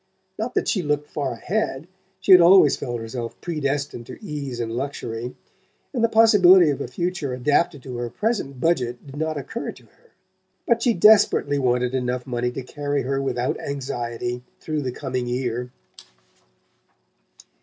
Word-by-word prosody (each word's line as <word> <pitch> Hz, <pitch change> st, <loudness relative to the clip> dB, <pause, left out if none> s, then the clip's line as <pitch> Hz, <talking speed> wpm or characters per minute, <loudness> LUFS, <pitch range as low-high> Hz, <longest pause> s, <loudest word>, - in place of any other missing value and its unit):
Not 225 Hz, +3 st, -3 dB
that -, -, 0 dB
she 195 Hz, -, +1 dB
looked 150 Hz, -2 st, -1 dB
far 140 Hz, -4 st, -2 dB
ahead; 160 Hz, -, -2 dB, 0.3 s
she 190 Hz, -, +1 dB
had 180 Hz, -1 st, +10 dB
always 170 Hz, -4 st, +7 dB
felt 120 Hz, -2 st, -4 dB
herself 115 Hz, +1 st, -6 dB
predestined 145 Hz, -6 st, -3 dB
to -, -, -9 dB
ease 145 Hz, -, -5 dB
and 115 Hz, -1 st, -3 dB
luxury, 120 Hz, -2 st, -4 dB, 0.6 s
and 240 Hz, -4 st, -1 dB
the 230 Hz, -, +4 dB
possibility 190 Hz, -7 st, +6 dB
of 140 Hz, -, -4 dB
a -, -, -3 dB
future 160 Hz, -1 st, -3 dB
adapted 145 Hz, +2 st, +1 dB
to 125 Hz, -2 st, -6 dB
her 120 Hz, 0 st, -3 dB
present 195 Hz, -, -2 dB
budget 125 Hz, -6 st, 0 dB
did 135 Hz, -1 st, -11 dB
not 155 Hz, 0 st, -2 dB
occur 225 Hz, -, -5 dB
to -, -, -18 dB
her. 475 Hz, -, -28 dB, 0.6 s
But 235 Hz, -1 st, +2 dB
she 235 Hz, -2 st, +2 dB
desperately 175 Hz, -7 st, +5 dB
wanted 125 Hz, -1 st, +1 dB
enough 125 Hz, -1 st, -2 dB
money 125 Hz, -1 st, -1 dB
to 130 Hz, -, -6 dB
carry 145 Hz, +1 st, -2 dB
her 135 Hz, +2 st, -1 dB
without 125 Hz, -2 st, -1 dB
anxiety 120 Hz, -3 st, -4 dB, 0.2 s
through 155 Hz, -1 st, -3 dB
the 130 Hz, -2 st, -3 dB
coming 125 Hz, 0 st, -4 dB
year. 125 Hz, 0 st, -2 dB
140 Hz, 160 wpm, -23 LUFS, 125-170 Hz, 0.6 s, had